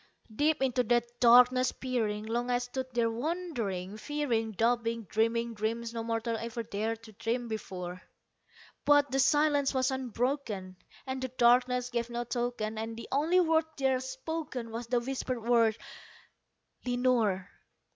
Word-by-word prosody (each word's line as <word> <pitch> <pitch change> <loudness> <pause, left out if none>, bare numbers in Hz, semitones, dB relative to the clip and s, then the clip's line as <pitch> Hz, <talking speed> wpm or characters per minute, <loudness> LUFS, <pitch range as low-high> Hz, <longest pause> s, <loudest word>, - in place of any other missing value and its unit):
Deep 295 +2 +2
into 255 -1 +2
that 240 0 +2
darkness 250 +1 +6
peering, 220 -5 -2
long 240 +2 -2
I 245 - +3
stood 250 +1 -4
there 235 -2 +1
wondering, 230 - -3
fearing, 240 -4 -1
Doubting, 230 +1 +1
dreaming 230 +3 0
dreams 225 +2 -3
no 230 - -3
mortal 230 0 -1
ever 230 +1 -4
dared 220 +2 -3
to 220 - -12
dream - - -22
to - - -14
dream 245 -1 -5
before; 185 -5 -5 0.8
But 290 -1 +4
the 270 - +1
silence 285 0 +3
was 260 +1 +2
unbroken, 245 -7 -2 0.3
and 260 -1 -4
the 260 - -1
darkness 250 0 +3
gave 235 -1 -1
no 240 0 -2
token, 240 -2 -2
And 225 0 -4
the 230 - -8
only 315 +7 +3
word 325 -2 +3
there 265 -2 +2
spoken 260 -2 -5
was 230 +1 -5
the 245 0 +2
whispered 255 -2 -3
word, 230 -2 +3 1.1
"Lenore!" 245 -7 +1
240 Hz, 150 wpm, -30 LUFS, 225-260 Hz, 1.1 s, darkness